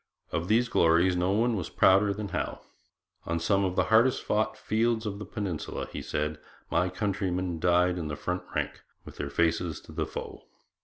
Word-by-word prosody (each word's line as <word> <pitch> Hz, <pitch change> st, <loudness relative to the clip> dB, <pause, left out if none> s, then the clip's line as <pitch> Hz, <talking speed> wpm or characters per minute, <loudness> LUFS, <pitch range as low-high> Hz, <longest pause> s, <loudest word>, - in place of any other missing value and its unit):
Of 85 Hz, 0 st, -2 dB
these 115 Hz, +4 st, +3 dB
glories 85 Hz, -1 st, +4 dB
no 90 Hz, +1 st, +1 dB
one 115 Hz, +3 st, +2 dB
was 90 Hz, -5 st, -3 dB
prouder 100 Hz, +2 st, +4 dB
than 100 Hz, 0 st, -4 dB
Howe. -, -, -3 dB, 0.7 s
'On 85 Hz, 0 st, 0 dB
some 100 Hz, +4 st, +2 dB
of 90 Hz, -1 st, -1 dB
the -, -, +3 dB
hardest 120 Hz, +3 st, +4 dB
fought 110 Hz, +1 st, 0 dB
fields 115 Hz, +1 st, 0 dB
of 100 Hz, -1 st, -4 dB
the 105 Hz, -, -6 dB
Peninsula,' 100 Hz, -8 st, -4 dB
he -, -, -5 dB
said, 75 Hz, +1 st, -2 dB, 0.3 s
'my 90 Hz, +1 st, +2 dB
countrymen 90 Hz, -3 st, -2 dB
died 90 Hz, +1 st, +3 dB
in 80 Hz, -, -3 dB
the 75 Hz, -, -3 dB
front 90 Hz, +4 st, -3 dB
rank, -, -, -2 dB, 0.2 s
with -, -, -11 dB
their 70 Hz, -, -3 dB
faces 85 Hz, +1 st, 0 dB
to -, -, -14 dB
the -, -, -2 dB
foe. -, -, -8 dB
90 Hz, 190 wpm, -28 LUFS, 85-105 Hz, 0.7 s, glories